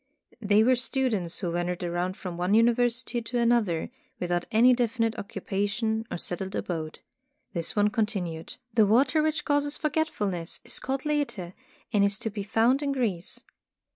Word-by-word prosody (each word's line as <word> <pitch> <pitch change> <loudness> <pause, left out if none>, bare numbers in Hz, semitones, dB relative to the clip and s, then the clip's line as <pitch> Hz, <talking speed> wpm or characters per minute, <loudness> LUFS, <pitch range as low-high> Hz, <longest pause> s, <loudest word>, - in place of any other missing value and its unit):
They 205 0 +4
were 255 +3 +5
stu 260 +1 0
dents 180 -7 -2
who 175 -3 -1
wandered 175 +1 -2
around 175 +2 -2
from 180 -2 -6
one 180 +4 +1
university 240 +1 +2
to 230 +2 -4
another, 235 -9 +1 0.3
without 175 -1 -1
any 240 +3 +6
definite 230 -2 0
occupation 205 +3 -2
or - - -3
settled 190 +3 -2
abode. 160 -3 -4 0.5
This 170 -3 -1
one 205 0 +3
continued: 195 -8 -3 0.2
''The 220 -3 +5
water 260 +8 +4
which 310 0 0
causes 290 0 +2
forgetfulness 210 - -1
is - - +2
called 265 +1 -3
Lethe, 285 -12 -2 0.4
and 205 -1 +4
is 200 0 +2
to 225 - -4
be 205 0 -4
found 225 +7 +2
in 285 -1 0
Greece. 205 -10 -2
215 Hz, 160 wpm, -27 LUFS, 180-245 Hz, 0.5 s, any